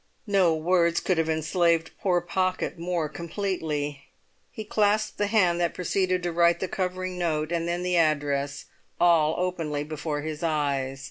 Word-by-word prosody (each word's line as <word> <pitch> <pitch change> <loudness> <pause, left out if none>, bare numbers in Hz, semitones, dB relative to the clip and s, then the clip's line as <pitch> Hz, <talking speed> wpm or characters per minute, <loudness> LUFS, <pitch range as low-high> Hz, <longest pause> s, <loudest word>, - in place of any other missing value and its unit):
No 190 -6 +3
words 170 +1 +2
could 185 -3 0
have 160 0 0
enslaved 165 +1 +1
poor 180 -3 +2
Pocket 185 0 -1
more 170 -2 -1
completely; 160 -5 -3 0.4
he 220 - -7
clasped 215 0 +1
the 205 - +2
hand 185 -5 +3
that 170 - 0
proceeded 185 0 0
to 175 - -1
write 170 0 +3
the 190 - -2
covering 185 0 -3
note, 155 -2 -1
and 170 -1 -1
then 175 +1 -2
the 180 -1 +1
address, 145 -3 0 0.3
all 165 -3 +4
openly 165 -5 -2
before 150 0 -4
his 155 0 -5
eyes. 140 -4 -1
170 Hz, 155 wpm, -26 LUFS, 155-185 Hz, 0.4 s, all